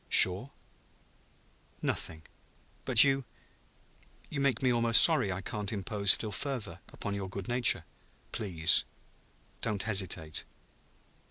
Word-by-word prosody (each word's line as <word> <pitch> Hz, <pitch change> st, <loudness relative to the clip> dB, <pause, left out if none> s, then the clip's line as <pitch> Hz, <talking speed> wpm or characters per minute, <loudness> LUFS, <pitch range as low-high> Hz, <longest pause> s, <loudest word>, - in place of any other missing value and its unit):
Sure?" 95 Hz, +9 st, +6 dB, 1.3 s
"Nothing. 80 Hz, -1 st, -2 dB, 0.6 s
But -, -, +7 dB
you 135 Hz, -1 st, 0 dB, 1.1 s
you 140 Hz, -, -4 dB
make 135 Hz, -3 st, -1 dB
me 125 Hz, -1 st, +1 dB
almost 115 Hz, -1 st, +5 dB
sorry 130 Hz, -, +3 dB
I 90 Hz, +1 st, -5 dB
can't 105 Hz, +1 st, -6 dB
impose 100 Hz, -1 st, -4 dB
still 110 Hz, -, +3 dB
further 110 Hz, -, -5 dB
upon 105 Hz, -, -7 dB
your 100 Hz, -2 st, -6 dB
good 95 Hz, 0 st, -8 dB
nature." 120 Hz, -9 st, +2 dB, 0.5 s
"Please 85 Hz, -6 st, +2 dB, 0.8 s
don't 105 Hz, -4 st, -3 dB
hesitate 95 Hz, -7 st, -2 dB
105 Hz, 110 wpm, -29 LUFS, 95-120 Hz, 1.3 s, But